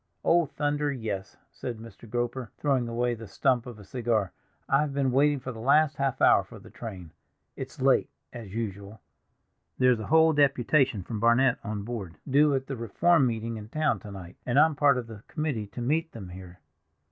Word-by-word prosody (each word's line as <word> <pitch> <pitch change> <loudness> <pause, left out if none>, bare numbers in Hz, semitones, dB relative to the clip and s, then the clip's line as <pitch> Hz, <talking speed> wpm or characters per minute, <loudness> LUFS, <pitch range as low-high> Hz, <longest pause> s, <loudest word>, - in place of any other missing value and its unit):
"Oh, 170 -2 +4
thunder, 145 0 -1
yes!" 110 -7 -5
said 120 -3 -6
Mr. 115 0 -13
Groper, 120 +1 -2
throwing 135 -5 +1
away 120 +1 0
the 115 -1 -8
stump 125 +4 +1
of 120 -3 -8
a 105 - -12
cigar. 115 -3 -1 0.4
"I 135 - +3
have 145 -2 -2
been 135 -2 +1
waiting 145 +2 +3
for 130 0 -6
the 115 - -9
last 145 +5 +3
half 135 -2 -1
hour - - +6
for - - -13
the - - -14
train; 95 -8 -8 0.4
it's - - -8
late, - - +3 0.2
as 115 -5 -8
usual. 100 -1 -5 0.8
There's 125 -2 +4
a 110 - -6
whole 160 +1 +5
deputation 135 - +2
from 110 +3 -5
Barnet 120 +3 +3
on 105 -2 -4
board, 100 -8 -6
due 145 +1 +4
at 135 0 -2
the 135 - -5
Reform 135 - +3
meeting 115 -1 -3
in 105 0 -9
town 150 -6 0
to 105 - -11
night, 95 -3 -10
and 125 +1 -1
I'm 155 +2 +6
part 140 -2 +4
of 125 - -3
the 110 -3 -11
committee 140 -9 -3
to 120 - -8
meet 160 +6 0
them 100 -6 -8
here." 90 0 -11
120 Hz, 195 wpm, -27 LUFS, 110-140 Hz, 0.8 s, hour